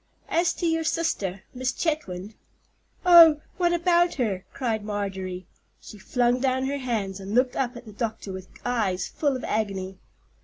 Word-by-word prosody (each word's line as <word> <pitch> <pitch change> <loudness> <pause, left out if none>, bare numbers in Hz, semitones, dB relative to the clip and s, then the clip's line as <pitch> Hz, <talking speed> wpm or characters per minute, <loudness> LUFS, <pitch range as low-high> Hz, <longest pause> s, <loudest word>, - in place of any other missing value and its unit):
As 340 +1 +2
to 350 - -3
your 325 -1 +1
sister, 205 - -1
Miss 255 0 -1
Chetwynd——" 215 - -3 0.7
"Oh, 335 -4 +9 0.2
what 350 -1 +2
about 345 0 +3
her?" 205 -8 -1
cried 225 -5 -2
Marjorie. 190 -3 -4 0.3
She 210 - -12
flung 245 +4 +1
down 260 0 +1
her 280 +1 -2
hands, 215 -7 -2
and 195 +2 -5
looked 250 0 +3
up 250 -2 -1
at 240 - -11
the 215 - -11
doctor 220 -3 -4
with 185 0 -8 0.2
eyes 200 -7 0
full 285 -3 -1
of 255 - -5
agony. 195 -3 -2
240 Hz, 160 wpm, -25 LUFS, 195-295 Hz, 0.7 s, Oh